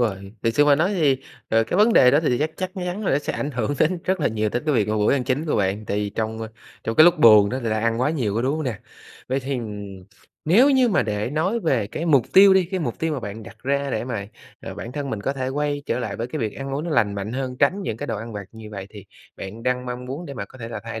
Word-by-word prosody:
rồi. 100 -4 -2
Thiệt 115 -1 +1
sự 145 - +5
mà 145 -1 +6
nói 175 +7 +1
thì, 150 -7 +3 0.3
ờ, 115 0 +3
cái 115 - -2
vấn 215 +3 +5
đề 125 - +7
đó 145 - +4
thì 125 -6 +1
chắc 155 +2 0
chắc 185 0 -3
chắn 180 +3 -4
là - - +1
nó 140 - +3
sẽ - - -4
ảnh 145 - -3
hưởng 125 +2 -2
đến 175 +3 +2
rất 190 -2 0
là - - +2
nhiều 110 -1 -1
đến 120 - -1
cái 150 - +2
việc 105 -3 +2
mà 110 - 0
bữa 105 +4 +3
ăn 130 -3 0
chính 145 +5 -1
của - - 0
bạn. 100 +1 0
Tại 100 - -2
vì 105 -1 -1
trong, 110 +1 -3
ơ, 110 - -5 0.4
trong 115 - -2
cái 155 - +9
lúc 175 -1 +5
buồn 105 -5 +7
đó 130 - -2
người 115 - -1
ta 110 0 0
ăn 115 +1 0
quá 130 - +2
nhiều 120 -10 -1
quá, 115 - 0
đúng 140 +4 0
không 155 - -3
nè? 115 -7 -3 0.5
Vậy 135 +1 0
thì, 135 +2 -3
ừm, 100 -4 -7 0.4
nếu 230 - +5
như 260 -2 +4
mà 205 - +2
để 105 +2 -2
nói 185 +10 0
về 130 - +1
cái 165 +10 -5
mục 140 -7 +4
tiêu 195 0 +8
đi, 190 -2 +4
cái 185 +1 -3
mục 120 -7 -3
tiêu 160 -1 -1
mà 135 - -3
bạn 105 +1 -7
đặt 115 - -12
ra 140 +1 0
để 110 - -2
mà, 110 -6 -4 0.3
à, - - -7
bản 120 - -7
thân 140 -1 -4
mình 110 -4 -3
có 135 - -1
thể 130 -2 -3
quay 145 +1 -2
trở - - -1
lại 110 -5 -4
với 115 - -3
cái 140 +5 -5
việc 110 -5 -2
ăn 135 0 -5
uống 150 +4 -3
nó 170 - -4
lành 105 -7 +2
mạnh 100 +2 -4
hơn, 130 -1 -3
tránh 185 +8 +2
những 110 - -3
cái - - -5
đồ 115 - -2
ăn 115 +1 -7
vặt 100 -1 -6
như 110 -1 -10
vậy, 100 -2 -7
thì 105 -3 -11 0.3
bạn 105 +4 -8
đang 125 0 -1
mong 125 0 -5
muốn 140 +7 -6
để 140 - -7
mà 100 - -4
có 130 - -16
thể 115 -1 -6
là 115 -3 -6
thay 115 -1 -5
125 Hz, 315 wpm, -23 LUFS, 110-150 Hz, 0.5 s, cái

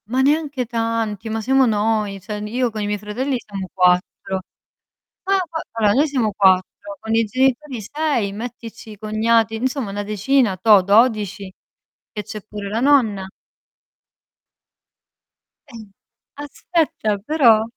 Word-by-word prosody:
Ma 255 +4 0
neanche 285 -2 +1
tanti, 225 -2 -2
ma 220 0 -2
siamo 265 +3 +3
noi, 215 -2 0
cioè, 210 +2 -6
n 210 - -5
io 245 +2 -1
con 215 -1 -5
i - - -1
miei 210 0 -1
fratelli 230 +7 -3
siamo 195 -4 -7
4. 180 +1 +1 0.8
Fa 390 +1 +1
fa 320 0 -4
allora, 215 -3 +2
noi 290 +4 +3
siamo 250 -8 -1
4, 190 +1 +1
con 220 0 -2
i 225 0 +3
genitori 260 +3 0
6, 245 -3 -1
mettici 230 0 -8
i 210 - -11
cognati, 220 +1 +1
insomma 255 -1 -2
una 205 +1 -3
decina, 215 +1 +1
toh, 200 +1 +5
12. 205 -2 +2 0.6
Che 210 - -5
c'è 215 +1 -8
pure 205 -1 -7
la 220 +3 -2
nonna. 235 -8 +3 2.4
Eh, 285 - -17
n - - -9 0.6
aspetta, 290 - -1
però 230 -1 +4
220 Hz, 140 wpm, -20 LUFS, 205-255 Hz, 2.4 s, toh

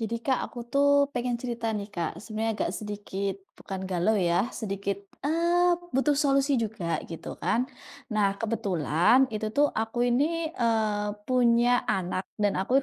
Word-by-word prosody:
Jadi 230 +1 -2
Kak, 265 -2 +2
aku 240 -1 -8
tuh 280 +3 +3 0.3
pengen 245 -1 -1
cerita 235 -2 -3
nih 210 -2 -3
Kak, 175 -6 -4
sebenarnya 220 +1 -2
agak - - 0
sedikit 205 -2 -4 0.2
bukan 190 -1 -6
galau 190 +4 +1
ya, 175 +6 +1
sedikit, 200 -2 -3 0.2
eee, 340 +4 +3 0.2
butuh 280 +2 +2
solusi 275 -1 +3
juga 210 -7 -2
gitu 165 - -8
kan. 250 +4 0 0.4
Nah, 205 -2 +2
kebetulan 200 - +2
itu 215 0 -3
tuh 290 0 +4
aku 225 +2 -1
ini, 315 +6 +1
eee, 220 -6 0
punya 245 0 +3
anak 185 -1 -1
dan 205 -1 0
aku 255 +9 +2
225 Hz, 150 wpm, -27 LUFS, 200-255 Hz, 0.4 s, tuh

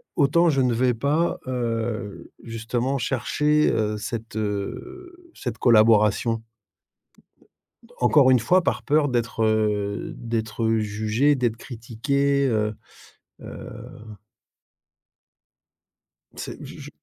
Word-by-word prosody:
autant 165 +4 +3
je 135 -3 +2
ne 125 -2 +2
vais 125 +1 +2
pas, 150 +8 0
heu, 115 -4 -3
justement, 120 +4 -2
chercher, 150 +5 +1
heu, 105 -1 -1
cette, 110 +1 -6
heu, 350 - -5
cette - - -5
collaboration. 110 0 +4 1.6
Encore 135 -4 +5
une 125 - +5
fois 180 +12 +3
par - - -1
peur 150 -1 +2
d'être, 120 -2 -1
heu, 105 -2 0
d'être 115 -1 -2
jugé, 110 +6 +1
d'être 120 -4 -1
critiqué, 140 +4 -1
heu 110 -3 0 0.7
heu - - -9 2.7
C'est - - -7
je - - -10
je - - -9
120 Hz, 100 wpm, -24 LUFS, 110-140 Hz, 2.7 s, Encore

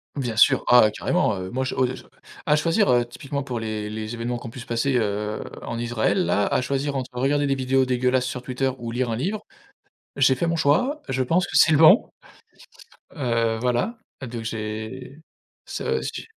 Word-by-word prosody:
Bien 125 -6 -3
sûr, 115 - +5
oh 125 - +9
ouais 110 - +4
carrément, 105 0 0
heu, 95 0 -5
moi 130 +2 -1
je 130 - -3
o 130 - +2
je 130 0 -5 0.4
à 150 - +5
choisir, 165 +7 +2
heu, 120 -1 +3
typiquement 140 +3 -5
pour 125 -3 -4
les 110 -1 -4
les 110 +1 -5
événements 120 +1 -3
qui 120 - -8
ont - - -6
pu 120 - -10
se 125 - -8
passer, 120 +3 0
heu, 105 -1 -2 0.2
en 115 - -5
Israël 120 - 0
là, 100 - +1
à - - +1
choisir 140 +2 -2
entre 130 -1 -4
regarder 140 +3 +1
des 140 - +1
vidéos 130 0 +1
dégueulasses 125 0 +1
sur 130 -1 -4
Twitter 130 +1 -1
ou 120 -1 -5
lire 120 0 -1
un - - -1
livre, 195 - -3 0.7
j'ai 135 -1 +4
fait 150 +7 -1
mon 165 0 0
choix, 250 - +1
je 130 0 0
pense 165 +8 +1
que - - -11
c'est 160 -2 +6
bon. 160 +8 +6 1.1
Heu, 115 -4 0
voilà. 125 - -1 0.2
Donc 120 -3 -6
j'ai 110 +5 -6 0.5
ça - - -2
j'ai - - -6
125 Hz, 200 wpm, -23 LUFS, 115-140 Hz, 1.1 s, oh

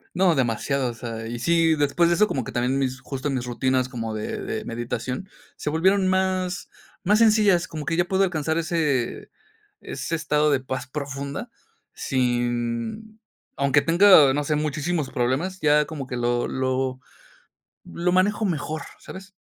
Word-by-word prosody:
No, 180 -1 +4
demasiado, 130 +1 0
o 120 - -5
sea, 115 -2 -6
y 120 +1 -5
sí, 165 +5 +3
después 155 +4 +2
de 170 - +3
eso 210 +4 +4
como 130 - -2
que - - -7
también 125 +3 0
mis 130 -1 -1
justo 135 +1 -4
mis 130 -3 -2
rutinas 130 +1 0
como 115 -3 -4
de 105 - -4
de - - -4
meditación 125 +8 -4 0.3
se 150 - -4
volvieron 185 +5 +2
más 185 -1 0 0.3
más 210 +4 +3
sencillas, 210 -5 +4
como 155 -2 -6
que 165 - 0
ya 175 +1 +2
puedo 190 +1 +1
alcanzar 160 -3 -1
ese, 155 -7 -1 0.5
ese 165 - -4
estado 150 -1 +1
de 135 -2 +2
paz 130 -1 -5
profunda 140 - -5 0.4
sin 120 - -2 0.4
aunque 140 +1 +3
tenga, 170 -5 +7
no 145 +1 0
sé, 150 - 0
muchísimos 155 +1 -2
problemas, 135 +10 -1
ya 150 0 +4
como 145 -5 -6
que 125 - -4
lo 120 0 0
lo 130 0 -1 0.9
lo 175 +1 -2
manejo 205 +4 +2
mejor, 155 -3 -2 0.2
¿sabes? 190 +1 -11
145 Hz, 160 wpm, -24 LUFS, 130-175 Hz, 0.9 s, tenga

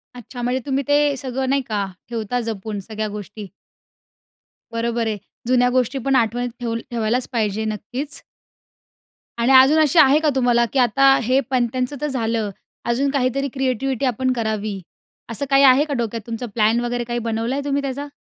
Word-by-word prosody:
अच्छा, 245 +1 -9
म्हणजे 250 +2 0
तुम्ही 275 0 0
ते 290 0 +3
सगळं 260 0 -3
नाही 275 0 +2
का? 205 -3 -1 0.2
ठेवता 230 +1 -2
जपून 210 -1 -4
सगळ्या 215 0 -3
गोष्टी. 210 0 -8 1.3
बरोबर 230 0 -1
आहे. 215 -1 -2 0.3
जुन्या 250 -1 +4
गोष्टी 255 +1 0
पण 270 -1 +2
आठवणीत 245 0 +1
ठेव 230 -1 -2 0.2
ठेवायलाचं 235 +2 0
पाहिजे. 220 -2 0
नक्कीच. 245 +7 -5 1.2
आणि 235 +3 +2
अजून 265 +4 +7
अशी 310 +1 +4
आहे 280 +2 +6
का 310 -1 +2
तुम्हाला? 245 -2 +3
की 270 - +2
आता 270 +3 +5
हे 255 +4 +3
पणत्यांचं 255 +1 0
तर 300 - 0
झालं, 230 -5 -1 0.4
अजून 260 +4 +1
काहीतरी 275 0 0
क्रिएटीव्हीटी 265 -1 -1
आपण 255 +1 0
करावी 215 -4 -2 0.5
असं 230 +5 -3
काही 275 0 +5
आहे 265 +1 +7
का 295 - -4
डोक्यात, 230 -1 -2
तुमचा 230 +1 -4
प्लॅन 220 +1 +3
वगैरे 240 0 -2
काही 240 0 -3
बनवलाय 230 +5 -1
तुम्ही 280 0 0
त्याचा? 280 +1 -4
245 Hz, 165 wpm, -21 LUFS, 225-270 Hz, 1.3 s, अजून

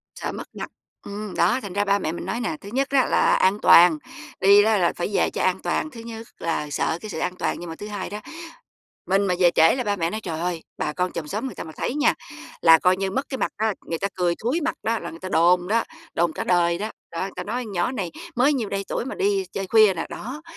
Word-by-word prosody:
Sợ - - -4
mất - - -7
mặt - - -5 0.4
ừm, 205 0 -6
đó, 250 - +3
thành 200 -5 -7
ra 205 0 +1
ba 200 0 +2
mẹ 155 - -2
mình 170 - -6
nói 235 - -2
nè, 215 -10 -2
thứ 200 - -9
nhất 270 +1 +1
á 270 -3 +3
là - - +3
an 195 +3 +3
toàn, 170 -2 +7 0.4
đi 200 +1 +7
đó 220 -1 +3
là 175 -2 +2
phải 175 - -2
về - - +2
cho - - -4
an - - +2
toàn, 310 - -1
thứ 230 - -10
nhất 230 0 -8
là 150 -3 -2
sợ 160 - -1
cái 215 - -7
sự 160 - -5
an 180 - -2
toàn - - -2
nhưng 175 -1 -7
mà 160 - -6
thứ 210 - -8
hai 205 -3 -5
đó, 210 +1 -5 0.9
mình 195 +1 +2
mà 180 - +1
về 175 -2 +5
trễ 165 +6 +6
là 250 -2 -2
ba 205 -1 0
mẹ 170 -2 -1
nói: 215 - -4
"Trời 165 -4 -4
ơi! 175 -2 -2 0.2
Bà 150 - -1
con 180 +3 -1
chòm 155 -3 -5
xóm 215 - -3
người 255 - -6
ta - - -6
mà 160 - -9
thấy 255 - -2
nha, 300 0 +3 0.5
là 165 -1 +8
coi 180 +2 +3
như 190 0 -2
mất 270 +7 -2
cái 265 - -4
mặt - - -1
á, 215 -1 0
người 165 - -3
ta 200 - -1
cười 175 -2 +1
thúi 265 +9 0
mặt 320 +1 -1
đó, 225 0 0
là - - -6
người 165 - -11
ta 185 - -5
đồn 175 +1 +3
đó, 225 +2 +2 0.3
đồn 170 -1 +1
cả - - -4
đời 170 -1 +2
đó. 215 +1 -3 0.2
Đó, 165 - -5
người 195 - -3
ta - - -4
nói 245 +4 -3
con 215 - -8
nhỏ 175 +6 0
này 190 -9 -3 0.3
mới 265 +5 +4
nhiêu 235 -7 -1
đây 195 0 -3
tuổi - - -2
mà 265 - -5
đi 395 -1 +1
chơi 195 -1 -3
khuya 215 -2 +5
nè", 165 - -3
đó, 265 +8 -7
200 Hz, 285 wpm, -24 LUFS, 175-230 Hz, 0.9 s, là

